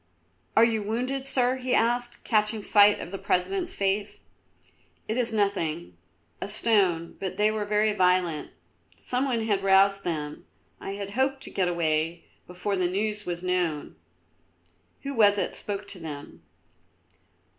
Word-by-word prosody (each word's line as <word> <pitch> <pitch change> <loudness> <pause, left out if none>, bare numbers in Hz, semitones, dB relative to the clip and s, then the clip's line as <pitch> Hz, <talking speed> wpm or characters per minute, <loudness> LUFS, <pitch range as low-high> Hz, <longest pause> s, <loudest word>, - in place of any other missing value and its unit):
"Are 225 - +8
you 225 -2 0
wounded, 255 +6 -2
Sir?" 255 -1 +2
he 255 -1 0
asked, 240 +1 0
catching 215 -1 +1
sight 205 0 +5
of 175 - -7
the 195 - -5
President's 350 - -1
face. 200 +1 -1 0.9
"It 220 - -1
is 240 -2 +2
nothing, 190 -6 -1 0.5
a - - -3
stone; 185 -7 +1
but 190 -1 -4
they 210 +1 +3
were 215 -1 -2
very 210 +1 +2
violent. 180 -4 +1 0.5
Some 255 +2 -1
one 240 -4 0
had 205 -3 0
roused 195 0 +4
them; 150 -4 -4 0.3
I 195 - -5
had 200 0 -6
hoped 265 +3 0
to - - -7
get 185 -2 0
away 165 -1 -1 0.2
before 180 +3 -3
the 185 -2 +1
news 210 +2 -2
was 175 0 -3
known. 180 -5 -1 1.1
Who 280 0 -4
was 205 -4 +5
it - - -2
spoke 200 0 -5
to 190 - -6
them?" 150 -3 -8
205 Hz, 150 wpm, -26 LUFS, 180-225 Hz, 1.1 s, Are